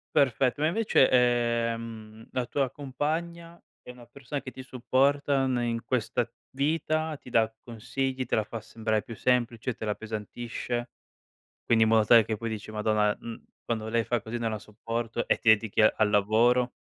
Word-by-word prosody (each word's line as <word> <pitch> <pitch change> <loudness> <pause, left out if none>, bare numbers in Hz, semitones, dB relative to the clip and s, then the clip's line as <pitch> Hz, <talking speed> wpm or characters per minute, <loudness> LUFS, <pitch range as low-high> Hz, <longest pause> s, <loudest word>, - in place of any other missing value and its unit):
Perfetto. 135 -1 +2
Ma 155 - +3
invece, 190 -6 +3
ehm, 115 -3 0
la 125 -1 -1
tua 135 +2 -1
compagna 165 +6 -4 0.2
è - - -14
una 125 -1 -11
persona 140 +3 -6
che 130 - -7
ti 130 - -9
supporta 135 +2 +1
ne 125 -2 0
in 115 -1 -2
questa 120 -1 -1 0.2
vita, 155 +2 -1
ti 125 - -14
dà 110 -1 +3
consigli, 130 +3 -3
te - - +1
la 110 - +1
fa 115 +1 -7
sembrare 110 -1 -2
più 115 - -9
semplice, 120 0 0
te 115 -1 -7
la 105 - 0
appesantisce? 115 +3 -5 0.8
Quindi 115 -1 +4
in 110 - +1
modo 110 -1 +4
tale 115 -1 +7
che 110 0 -3
poi 115 - -4
dici: 110 -1 -6
"Madonna, 105 -1 +1
mhmm, 115 -1 -8 0.2
quando 110 -2 -3
lei 115 0 +1
fa 120 -2 -1
così 115 +2 -5
non 115 -1 -1
la 110 - -3
sopporto." 115 +3 -4
E - - +4
ti 110 - +4
dedichi 110 -1 +3
a 110 - +6
al 110 - +4
lavoro. 115 +5 +3
120 Hz, 180 wpm, -28 LUFS, 110-130 Hz, 0.8 s, tale